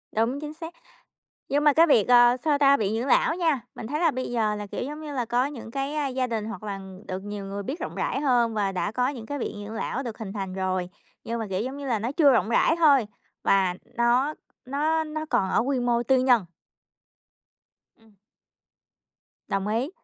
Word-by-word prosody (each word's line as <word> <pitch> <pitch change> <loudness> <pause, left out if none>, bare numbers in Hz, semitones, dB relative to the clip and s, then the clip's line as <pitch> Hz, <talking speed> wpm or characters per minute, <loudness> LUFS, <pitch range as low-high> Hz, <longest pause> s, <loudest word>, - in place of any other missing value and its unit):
Đúng, 230 +5 +1
chính 300 0 -6
xác. 325 +1 -8 0.8
Nhưng 290 +1 +1
mà 295 - +6
cái 325 +4 +5
việc, 235 -9 +4
ờ, 240 0 +6
sao 300 -2 +2
ta? 280 -1 +6
Viện 215 -4 -1
dưỡng 240 - -2
lão 280 +4 +3
nha, 325 -7 +1
mình 225 - -7
thấy 295 +6 -2
là 335 -2 +4
bây 255 -3 -4
giờ 220 -3 +1
là, 210 0 -5
kiểu, - - -5
giống 295 +4 -5
như 305 -2 -7
là 250 - -1
có 245 +3 +1
những 260 -6 -8
cái, 275 +3 -3
a, 300 -2 0
gia 255 -1 -1
đình 225 -3 -3
hoặc 225 +1 -7
là 200 -2 -5 0.3
được 185 0 -4
nhiều 205 0 -6
người 200 +1 -5
biết 270 - -5
rộng - - -5
rãi - - -1
hơn 240 -5 +2
và 200 -2 0
đã 195 +2 -2
có 250 +2 +1
những 245 -6 -6
cái 285 +3 -4
viện 210 -4 -5
dưỡng 220 - -7
lão 240 +4 -3
được 235 -5 -6
hình 215 -4 -6
thành 195 -3 -4
rồi, 185 -1 -1 0.4
nhưng 235 0 -3
mà, 225 - -3
kiểu, 185 0 -1
giống 260 +5 -4
như 285 -1 -6
là 235 -4 +1
nó 230 +5 -3
chưa 290 -2 +5
rộng 215 -5 +2
rãi 235 +7 +3
thôi 285 -8 +5 0.4
và 190 -2 +3 0.2
nó 245 +5 +2 0.3
nó 305 +4 0
nó 310 0 -5
còn 190 -8 +1
ở - - +2
quy 260 +1 0
mô 240 -1 +1
tư 260 +2 +3
nhân. 245 -6 +4 1.5
Ừm. 225 -1 -24 1.3
Đồng 195 0 -1
ý, 230 +7 0
245 Hz, 225 wpm, -25 LUFS, 215-285 Hz, 1.5 s, mà